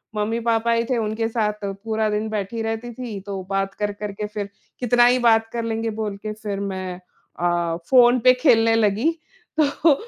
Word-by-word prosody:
मम्मी-पापा 225 +2 0
ही 230 0 +2
थे 255 - +1
उनके 220 0 -1
साथ 210 -2 -1
पूरा 215 +2 -2
दिन 210 +1 -1
बैठी 215 +1 -3
रहती 225 +2 -3
थी। 230 -4 -6
तो 195 -1 -4
बात 195 0 -1
कर-कर 205 0 -4
के 210 +1 -5
फ़िर 205 -1 -5 0.3
कितना 245 0 +4
ही 250 +1 +4
बात 225 -2 +4
कर 235 -1 -2
लेंगे 225 0 -2
बोल 205 -2 -3
के 215 +1 -5
फ़िर 210 -2 -5
मैं 185 -2 -4 0.4
अ, 175 -1 0
फ़ोन 250 -1 +6
पे 255 +2 +6
खेलने 230 -6 +5
लगी। 220 +7 +2 0.5
तो 300 +1 +4
220 Hz, 180 wpm, -22 LUFS, 205-230 Hz, 0.5 s, फ़ोन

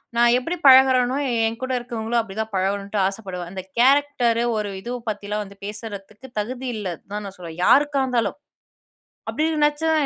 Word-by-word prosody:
நான் 235 0 +5
எப்டி 330 +8 -3
பழகறேனோ, 260 -1 +6 0.3
என் 225 +1 -5
கூட 260 - -3
இருக்குறவங்களும் 235 -1 -1
அப்டி 205 -3 -10
தான் 220 0 -5
பழகணுன்ட்டு 200 +2 -1
ஆசப்படுவேன்." 190 -4 -6
அந்த 190 0 -5 0.2
கேரக்டர் 260 -3 +3 0.2
ஒரு 210 -1 -2
இது 240 - -6 0.2
பத்திலாம் 210 0 -3
வந்து 200 0 -14
பேசுறதுக்கு 210 +3 -8
தகுதி 250 +4 -4
இல்ல 205 -3 -4 0.2
தான் 210 0 -3
நான் 195 -1 -8
சொல்றேன், 170 -2 -9
யாருக்கா 285 -1 +4
இருந்தாலும். 245 0 -1 0.9
அப்டி 310 +1 0
நெனைச்சா, 295 +2 +2
225 Hz, 155 wpm, -22 LUFS, 205-260 Hz, 0.9 s, பழகறேனோ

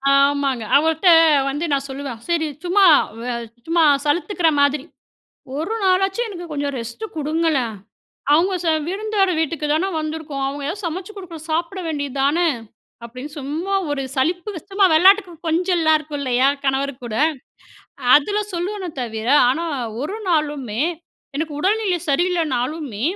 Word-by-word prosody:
ஆமாங்க. 275 -3 +2
அவர்ட்ட 320 +4 +1 0.4
வந்து 295 +5 -2
நான் 275 0 0
சொல்லுவேன். 265 -3 -6
சரி 330 -2 +1 0.2
சும்மா 380 +3 +4 0.3
வே 245 +1 -3 0.3
சும்மா 335 0 +3 0.2
சலுத்துக்கிற 345 +3 +1
மாதிரி, 285 0 +2 0.7
ஒரு 335 +9 -2
நாளாச்சும் 385 +5 +2
எனக்கு 350 -3 -7
கொஞ்சம் 285 -1 -2
ரெஸ்ட்டு 235 - -6
கொடுங்களேன். 305 -6 0 0.6
அவங்க 360 +5 +3
செ 335 - +1 0.2
விருந்தோர் 400 -1 0
வீட்டுக்கு 320 -1 -1
தானே 350 +5 +1
வந்துருக்கோம். 310 -3 -4
அவங்க 280 +1 -5
எதாவது 390 +5 -5
சமைச்சு 360 +5 -4
கொடுக்கணும் 335 -4 -9
சாப்பிட 335 +4 -1
வேண்டியது 285 -3 -3
தானே. 335 +5 +2 0.6
அப்படின்னு 255 +5 -8
சும்மா 315 +8 -3 0.2
ஒரு 285 -1 -1
சலிப்பு 345 +9 0 0.2
சும்மா 390 0 +4
வெள்ளாட்டுக்கு 380 +3 +5 0.2
கொஞ்சலாம் 330 -1 +2
இருக்கும் 300 -1 -7
இல்லையா 255 0 +2 0.2
கணவர் 270 +1 +1
கூட, 220 -2 -5 1.0
அதில 405 +9 +3
சொல்லுவேனே, 370 +2 -3
தவிர 225 -1 -4 0.2
ஆனா 325 +6 -1 0.4
ஒரு 385 +8 -4
நாளுமே 290 -8 0 0.5
எனக்கு 310 0 -3
உடல்நிலை 390 -1 +1
சரியில்லைனாலுமே, 295 - -1
315 Hz, 130 wpm, -21 LUFS, 280-360 Hz, 1.0 s, வெள்ளாட்டுக்கு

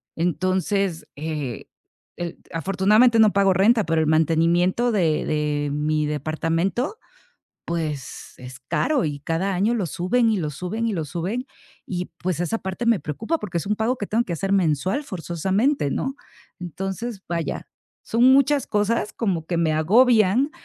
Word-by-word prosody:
Entonces, 185 +2 0
eh, 145 -6 -4 0.5
el 175 -1 -6
afortunadamente 200 - +3
no 215 -2 +6
pago 195 -1 +4
renta, 210 +4 +3
pero 165 -1 +1
el 155 - 0
mantenimiento 170 +8 +2
de 170 -8 +1
de 150 -1 -1
mi 150 +1 0
departamento, 165 - -1 0.7
pues, 155 -5 -4
es 125 +1 -10
caro, 270 - 0
y 145 -2 -3
cada 165 +7 -1
año 205 +6 +2
lo 220 -6 -1
suben, 225 - +1
y 210 - +1
lo 155 -4 -2
suben, 205 +10 -3
y 215 - -1
lo 160 -4 -2
suben 185 - -3 0.4
y, 180 -1 -3
pues, 180 -3 -2
esa 175 +6 -1
parte 190 +5 -4
me 230 -4 +4
preocupa 190 - -2
porque 180 -5 -4
es - - -6
un 210 - +1
pago 220 +4 0
que 205 - -4
tengo 230 +3 +1
que 180 - -4
hacer 195 +4 -2
mensual, 185 - +1
forzosamente, 190 - -1
¿no? 270 - -2 0.4
Entonces, 195 +5 -5
vaya, 170 -2 -3 0.4
son 230 +2 +1
muchas 275 0 +3
cosas 210 +1 0
como 185 -8 -1
que 170 - -1
me 165 -2 +2
agobian 220 - +4
185 Hz, 155 wpm, -23 LUFS, 160-220 Hz, 0.7 s, no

